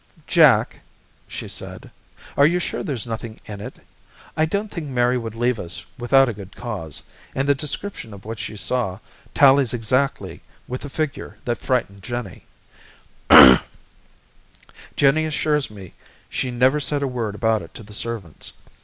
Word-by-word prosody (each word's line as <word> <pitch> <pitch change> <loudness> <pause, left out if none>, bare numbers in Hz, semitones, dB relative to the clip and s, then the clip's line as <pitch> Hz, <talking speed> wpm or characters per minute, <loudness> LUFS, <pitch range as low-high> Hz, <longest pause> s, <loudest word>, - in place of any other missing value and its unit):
"Jack," - - +4 0.5
she - - -7
said, - - -8 0.4
"are 140 - +6
you 175 +3 +1
sure - - -3
there's 135 - -4
nothing 115 -1 -6
in 105 -1 -8
it? - - -8 0.6
I 155 - +2
don't 200 +6 -2
think 165 -4 -5
Mary 125 -1 +2
would 115 -3 -4
leave 120 0 0
us 90 +2 -3
without 135 +2 +4
a 120 - -2
good 100 0 -11
cause, 95 - -4 0.3
and 135 +1 0
the 140 - +5
description 150 - -5
of 100 -1 -12
what 110 0 -6
she 105 - -6
saw 105 -4 -1 0.4
tallies 135 -3 +5
exactly 130 +4 -1 0.3
with 125 +1 -5
the 145 - -7
figure 155 0 -4
that 120 -2 -1
frightened 105 -6 -1
Jennie. 120 -4 -6 2.5
Jennie 145 +3 +3
assures 150 -1 0
me 100 -4 -12 0.4
she 130 - -2
never 130 +4 +2
said 145 0 -1
a - - 0
word 115 -5 -3
about 110 -1 +1
it - - -13
to - - -9
the 105 0 -13
servants. 105 -7 -4
120 Hz, 155 wpm, -22 LUFS, 110-140 Hz, 2.5 s, are